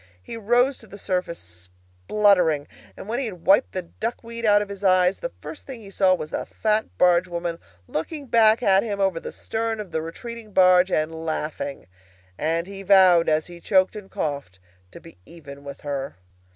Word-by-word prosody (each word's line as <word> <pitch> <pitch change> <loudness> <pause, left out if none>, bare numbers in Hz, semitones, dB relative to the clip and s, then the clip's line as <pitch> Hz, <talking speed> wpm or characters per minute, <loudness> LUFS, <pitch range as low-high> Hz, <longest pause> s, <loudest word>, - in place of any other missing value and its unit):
He - - -8
rose 240 +5 +2
to 220 - -13
the 200 - -11
surface 180 -4 -2 0.7
spluttering, 180 -8 +3 0.3
and - - -9
when 235 +3 -2
he 275 - -1
had 180 -7 -8
wiped 195 - +4
the 185 - -3
duck 225 +8 -5
weed 230 0 -4
out 205 0 +5
of 205 - -12
his 200 0 -8
eyes 185 0 +3
the - - -4
first 310 - -9
thing 255 -4 -8
he 200 -2 -12
saw 190 -1 +3
was 155 -2 -7
the - - -2
fat 215 0 -1
barge 180 0 +4
woman 170 -1 -4 0.3
looking 285 - -4
back 230 -1 +4
at 195 -2 +5
him 205 -3 -4
over 190 -4 +1
the - - -7
stern 225 0 -3
of 205 -4 -7
the 160 - -1
retreating 220 +6 -8
barge 185 0 +5
and 155 +1 0
laughing; 155 -3 -4 0.5
and 165 - -1
he 195 +1 -9
vowed, 185 -4 +5
as 155 0 +1
he 175 -1 -12
coughed 190 +2 +2
and 205 -2 -10
choked, 140 -11 -4 0.3
to - - -12
be 165 - -16
even 140 -4 -12
with 140 0 -9
her. 140 - -4
185 Hz, 195 wpm, -23 LUFS, 165-215 Hz, 0.7 s, out